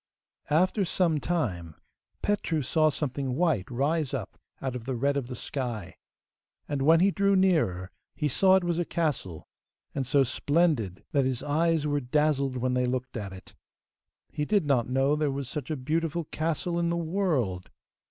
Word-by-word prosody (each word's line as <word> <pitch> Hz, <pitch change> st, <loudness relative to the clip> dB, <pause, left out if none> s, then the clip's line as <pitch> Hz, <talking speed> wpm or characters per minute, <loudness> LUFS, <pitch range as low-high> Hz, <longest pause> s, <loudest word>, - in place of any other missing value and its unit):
After 185 Hz, +6 st, +3 dB
some 170 Hz, -4 st, +1 dB
time 95 Hz, -, -2 dB, 0.5 s
Petru 175 Hz, -7 st, 0 dB
saw 155 Hz, +4 st, +3 dB
something 135 Hz, -3 st, -2 dB
white 155 Hz, -, +1 dB
rise 145 Hz, +4 st, 0 dB
up -, -, -5 dB, 0.2 s
out 130 Hz, -2 st, -3 dB
of 120 Hz, -2 st, -6 dB
the 130 Hz, 0 st, -2 dB
red 140 Hz, +4 st, +1 dB
of 140 Hz, -4 st, -2 dB
the 125 Hz, -, -6 dB
sky, 115 Hz, -8 st, -4 dB, 0.7 s
and 145 Hz, -2 st, -2 dB
when 160 Hz, +4 st, +5 dB
he 195 Hz, +2 st, +4 dB
drew 200 Hz, 0 st, +2 dB
nearer 155 Hz, -, +2 dB, 0.2 s
he 150 Hz, -, 0 dB
saw 190 Hz, +7 st, +4 dB
it 190 Hz, -, +3 dB
was 175 Hz, -1 st, 0 dB
a -, -, +2 dB
castle, 150 Hz, -, -2 dB, 0.5 s
and 135 Hz, -3 st, -2 dB
so 140 Hz, +1 st, +4 dB
splendid 145 Hz, -, 0 dB
that 140 Hz, -3 st, +2 dB
his 130 Hz, -2 st, -1 dB
eyes 160 Hz, +1 st, +1 dB
were 145 Hz, -1 st, +1 dB
dazzled 140 Hz, 0 st, +1 dB
when 125 Hz, +1 st, 0 dB
they 125 Hz, 0 st, +1 dB
looked 130 Hz, +1 st, -3 dB
at 105 Hz, -4 st, -4 dB
it. 95 Hz, 0 st, -12 dB, 0.8 s
He 150 Hz, -, -2 dB
did 200 Hz, +2 st, +2 dB
not 130 Hz, -5 st, +1 dB
know 135 Hz, +3 st, +2 dB
there 150 Hz, -1 st, 0 dB
was 135 Hz, -1 st, -3 dB
such 140 Hz, -1 st, -5 dB
a 155 Hz, -, -2 dB
beautiful 160 Hz, +5 st, -1 dB
castle 165 Hz, +3 st, -2 dB
in 170 Hz, 0 st, +1 dB
the 170 Hz, -, 0 dB
world. 160 Hz, -, -1 dB
145 Hz, 175 wpm, -28 LUFS, 125-165 Hz, 0.8 s, when